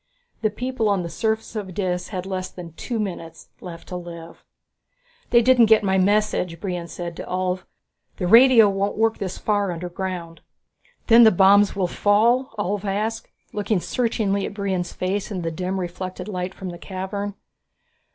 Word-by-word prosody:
The 215 - +2
people 240 0 -2
on 195 -3 +1
the 170 - -5
surface 220 +5 -2
of 190 -4 -5
Dis 180 -3 -2
had 185 -3 -5
less 185 -1 -4
than 170 -3 -10
two 235 +7 -4
minutes 170 -5 -6
left 170 -2 -10
to 180 - -5
live. 170 -1 -9 0.9
"They 235 -1 +5
didn't 245 -2 +5
get 220 -1 +5
my 190 -1 +2
message," 190 -3 +1
Brion 180 -3 -4
said 170 -1 -6
to - - -6
Ulv. 185 0 -2 0.5
"The 180 - -2
radio 230 +2 +7
won't 200 +1 -1
work 225 0 +1
this 190 -2 -4
far 205 -3 0
underground." 175 -1 -5 0.6
"Then 235 0 +7
the 220 - +9
bombs 200 +1 +5
will 195 -2 +1
fall?" 225 +7 +2
Ulv 205 0 -2
asked, 215 +3 -2 0.3
looking 205 -1 0
searchingly 205 -2 -1
at - - -9
Brion's 190 -4 -2
face 190 +2 -2
in 185 -5 -4
the 165 - -2
dim 185 +3 -3
reflected 180 +1 -5
light 185 -2 -4
from 190 - -6
the 175 -1 -8
cavern. 200 +2 -5
195 Hz, 170 wpm, -23 LUFS, 180-210 Hz, 0.9 s, the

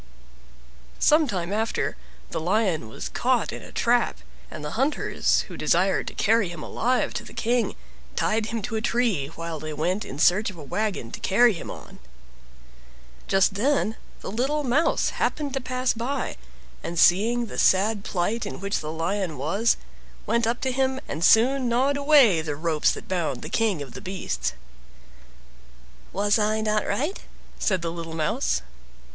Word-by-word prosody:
Some 305 0 +4
time 185 -4 -2
after 220 +2 -1 0.4
the - - -2
Lion 175 - 0
was - - -6
caught - - 0
in - - -7
a - - -12
trap, - - +2 0.3
and 150 - -7
the 150 - -4
hunters, 270 +6 +1
who - - -9
desired - - +1
to - - -6
carry 220 -3 +2
him 165 -3 -7
alive 250 +2 0
to - - -4
the - - -13
King, 240 +1 0 0.4
tied 215 0 +1
him 230 -2 -3
to 240 -2 -3
a 220 - -1
tree 225 - +1
while 165 +1 -6
they 155 +1 -5
went 180 +8 -1
in 135 - -8
search 190 +8 +4
of 190 - -10
a 155 - -9
wagon 195 - -2
to - - -7
carry 235 +4 +4
him 170 - -7
on. - - -10 1.3
Just 195 0 +3
then 225 +1 +1 0.3
the - - -5
little 270 +7 0
Mouse 285 +6 +2
happened 290 -3 -1
to 270 - -1
pass 255 0 0
by, 255 +4 -3 0.5
and 170 - -5
seeing 225 +9 +4
the 220 - -6
sad 200 +2 +3
plight 205 +6 -1
in 200 - -6
which 200 +1 -1
the 155 0 -5
Lion 170 0 -2
was, 195 - +1 0.5
went 235 -1 +1
up 235 +1 -1
to 260 - 0
him 265 0 0
and 155 +3 -4
soon 250 +5 +5
gnawed 260 +4 +2
away 280 - +5
the 155 -2 -3
ropes 155 0 +1
that - - -9
bound 165 -8 -2
the - - -6
King 210 -10 +1
of 135 - -12
the - - -8
Beasts. 180 - -3 1.6
"Was 205 +2 +2
I 215 +1 +1
not 215 0 0
right?" 290 - -1 0.4
said 190 -4 +1
the 165 - -2
little 165 -1 -6
Mouse. 65 - 0
210 Hz, 170 wpm, -25 LUFS, 170-240 Hz, 1.6 s, soon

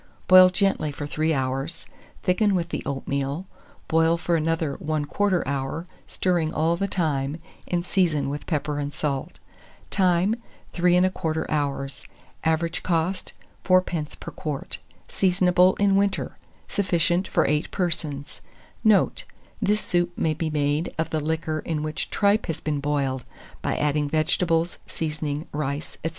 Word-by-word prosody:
Boil 185 0 +9
gently 195 -5 +1
for 145 +1 -5
3 155 +2 0
hours; 135 +3 -2 0.4
thicken 195 +2 +3
with 170 -2 -1
the - - -3
oatmeal, 140 +4 -2 0.4
boil 165 +1 +3
for 170 0 0
another 160 -2 0
1/4 155 +5 0
hour, 140 +4 -2 0.2
stirring 175 -4 0
all 165 +1 +1
the 195 +3 -1
time, 150 -6 -1 0.3
and 175 -1 -1
season 175 -7 +1
with 145 +1 -5
pepper 150 -2 -1
and 145 0 -2
salt. 140 -2 -2 0.5
Time. 185 +1 +3 0.4
3 175 0 +3
1/4 180 -3 +1
hours. 140 -2 -2 0.4
Average 160 +1 +1
cost, 175 +2 -1 0.3
4d. 180 -5 +1
per - - -7
quart. 150 -3 -5 0.3
Seasonable 180 -1 +3
in 200 -1 +3
winter. 200 0 0 0.3
Sufficient 180 -1 +1
for - - +2
8 150 +2 +1
persons. 155 -6 -3 0.4
Note. 215 -2 +3 0.4
This 210 0 +2
soup 175 0 0
may 160 - +1
be 160 +1 -2
made 150 +1 0
of 160 - -1
the 155 - +1
liquor 155 0 -1
in 155 -2 -3
which 155 0 -3
tripe 205 +1 +2
has 165 -2 -3
been 150 -2 -2
boiled, 140 -3 -1 0.4
by - - -1
adding 150 0 +1
vegetables, 165 +2 +1
seasoning, 150 -1 -3
rice, 145 0 -3
&c. 160 - 0
160 Hz, 140 wpm, -25 LUFS, 150-180 Hz, 0.5 s, Boil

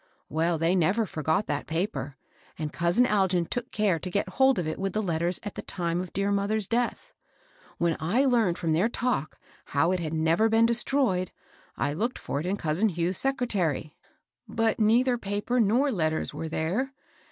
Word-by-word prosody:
Well, 165 +2 +1
they 165 +3 +2
never 190 +6 +2
forgot 160 +3 -1
that 145 -1 -3
paper; 160 -5 -3 0.4
and 155 -1 -4
cous 170 +3 0
in 250 - +6
Algin 190 -6 +2
took 245 0 -3
care 205 -8 +1
to 185 - -5
get 200 +3 0
hold 265 -1 +3
of 175 -3 -1
it 155 - -3
with 195 0 -2
the 215 - 0
letters, 170 0 -1
at 205 - -5
the - - -6
time 170 0 -2
of 185 - -7
dear 200 +1 0
mother's 200 +1 0
death. 245 - -2 0.6
When 170 -1 +1
I 215 - +2
learned 230 -9 +2
from 165 -2 0
their 185 +8 +2
talk, 240 - -2 0.3
how 145 +5 +1
it 185 - 0
had 160 -2 -3
never 165 +7 +3
been 225 +1 +4
de 235 - +3
stroyed, 235 -7 0 0.5
I 145 - 0
looked 230 +10 -2
for 140 - -3
it 160 - -4
in 195 +2 0
cousin 165 +7 +1
Hugh's 175 +1 -1
secretary. 200 - 0 0.5
But 225 0 0
neither 240 +3 +3
paper 205 +5 -1
nor 240 +6 +3
letters 160 -7 -1
^e 160 - -5
there. 195 +13 -1
190 Hz, 190 wpm, -27 LUFS, 165-225 Hz, 0.6 s, in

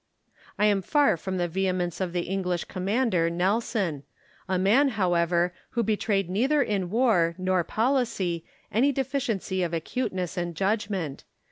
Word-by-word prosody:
I 210 - +3
am 205 -2 +3
far 290 - +3
from 185 +3 -4
the 175 -1 0
vehemence 180 0 -1
of 185 -2 -1
the 175 0 -1
English 180 -1 -2
commander, 190 -2 0
Nelson 190 - 0 0.2
— - - -31
a 190 - +1
man, 215 +10 +4
however, 175 -2 +2 0.2
who 235 - +3
betrayed 205 -3 0
neither 265 +10 +2
in 195 -6 -1
war 195 -7 +2
nor 185 -1 +1
policy 220 -8 0 0.3
any 255 +7 +3
deficiency 245 -8 -2
of 170 -1 -1
acuteness 185 0 -3
and 175 -1 -2
judgment. 195 -6 -1
190 Hz, 145 wpm, -26 LUFS, 175-220 Hz, 0.3 s, man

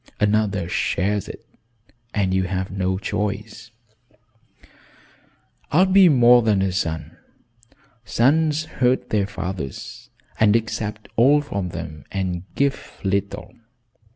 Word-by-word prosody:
"Another 105 -3 +1
shares 95 +3 -1
it - - -10 0.7
and 95 -4 0
you 95 0 +1
have 95 +1 -3
no 95 -1 -1
choice." 105 +3 -4 2.0
"I 170 +6 +5
will 190 - 0
be 190 -2 +7
more 125 -3 +6
than 105 -4 +2
a 95 - 0
son. 85 -3 -3 0.9
Sons 150 +6 +2 0.2
hurt 125 +1 +2
their 100 -2 +1
fathers 95 -8 -6 0.3
and 110 -1 +4
accept 110 -1 -3
all 135 +6 +5
from 100 -10 -4
them 80 -3 -8
and 90 -2 -3
give 140 0 -2
little. 100 +1 -2
105 Hz, 115 wpm, -22 LUFS, 95-120 Hz, 2.0 s, be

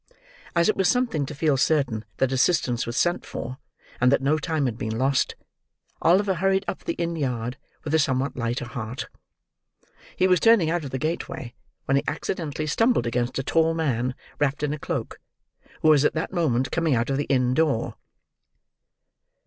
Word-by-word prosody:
As 170 0 +4
it 215 - +3
was 190 - +2
something 235 - +1
to 150 - -7
feel 145 -1 +2
certain 130 -7 +1
that 130 -1 +1
assistance 130 -3 +1
was 120 - -3
sent 175 +1 +1
for, 130 +2 -6 0.4
and 125 +1 +4
that 140 - +4
no 145 +3 +1
time 155 -2 -1
had 120 -4 -1
been 110 -2 -3
lost, 135 +2 +1 0.7
Oliver 190 +3 +4
hurried 195 +2 +1
up - - -4
the - - -2
inn 170 0 -2
yard, 125 -5 -2 0.3
with 155 - -4
a 160 - +4
somewhat 135 -1 0
lighter 120 0 -2
heart. 120 0 -6 1.1
He 185 - +2
was 180 -2 +4
turning 215 -8 +5
out 175 -1 -1
of 140 - -5
the 130 - -3
gateway 135 -4 -4 0.3
when 135 - +2
he 140 - +1
accidently 155 -1 -3
stumbled 225 - +2
against 120 +1 -1
a 135 - -1
tall 165 +3 +2
man 130 -6 -1 0.2
wrapped 145 0 0
in 150 0 0
a 150 - -5
cloak, - - -4 0.6
who 155 - +6
was 150 -2 +6
at - - +3
that 160 +3 -3
moment 135 -8 +1
coming 165 -5 +1
out 120 +3 0
of 135 - +1
the 145 - -1
inn 125 -2 +2
door. 145 -5 +1
145 Hz, 185 wpm, -25 LUFS, 125-165 Hz, 1.1 s, who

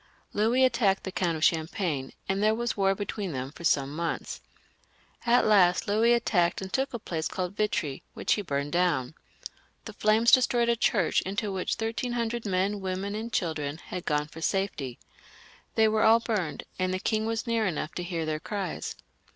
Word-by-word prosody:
Louis 235 +5 +3
attacked 200 -6 +2
the 190 - -4
Count 170 -3 0
of 155 - -4
Champagne, 160 -4 0 0.2
and 195 +1 0
there 215 +1 +3
was 235 0 -2
war 195 -1 +2
between 200 -3 -4
them 130 +1 -4
for 170 - -12
some 140 -3 +1
months. 165 0 -3 0.9
At 245 +1 +5
last 185 -4 +4
Louis 220 +3 +4
attacked 180 -7 +2
and 190 -1 -7
took 270 +4 0
a 235 - -3
place 165 -7 -3
called 185 +1 -4
Vitri, 180 -10 -1
which - - +1
he 210 - -1
burned 140 -5 -2
down. 170 -7 +1 0.7
The 220 - -7
flames 215 +3 +3
destroyed 240 -2 +4
a 235 - +4
church 205 -6 +2
into 200 +2 -2
which 190 -1 -1
thirteen 230 +2 -2
hundred 235 -1 -2
men, 195 +2 0
women, 190 +2 -3
and 225 +2 -4
children 155 -7 -2
had 180 +1 -7
gone 150 -1 +1
for 160 +1 -11
safety. 160 -10 -1 0.8
They 220 0 +5
were 215 0 +2
all 225 +1 +6
burned, 210 -9 -2 0.2
and 185 0 +1
the 185 - 0
king 220 +2 0
was 225 0 -2
near 230 -3 +1
enough 155 -3 -3
to - - -4
hear 170 -2 -3
their 155 -1 -2
cries. 195 -1 -4
195 Hz, 185 wpm, -28 LUFS, 165-220 Hz, 0.9 s, all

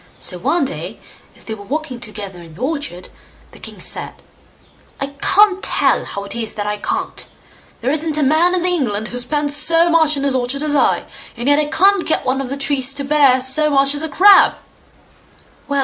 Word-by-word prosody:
So 180 - -4
one 325 - 0
day, 275 - -7 0.4
as - - -11
they 220 - -6
were 205 -2 -9
walking 280 +2 -5
together 210 -5 -7
in 165 -2 -14
the 210 - -13
orchard, 280 - -4 0.4
the - - -16
king - - -10
said, - - -2 0.8
"I 275 +1 -4
can't 395 -1 +4
tell - - +1
how 200 - -6
it 200 - -8
is 225 -2 -4
that 205 - -4
I 210 0 -2
can't! - - -4 0.5
there 250 +4 -1
isn't 310 0 -1
a, 300 - +1
man 320 +6 +3
in 360 -1 -1
England 235 - -1
who 245 - -5
spends 290 +3 -1
so 335 +2 +4
much 320 -3 +3
on 275 - -3
his 280 -1 0
orchard 260 +3 -1
as 300 -1 -1
I, - - +2 0.3
and 240 +3 -4
yet 285 +1 +4
I 300 - +1
can't 375 +5 +3
get 315 - 0
one 265 +1 0
of 260 - -6
the 275 - -4
trees 275 -1 -1
to 280 - 0
bear 280 -3 +3
so 285 +4 +3
much 275 -1 +2
as 290 - -2
a 320 - -4
crab." 390 +7 +6 1.1
"Well! 280 -1 -1
280 Hz, 210 wpm, -17 LUFS, 245-310 Hz, 1.1 s, crab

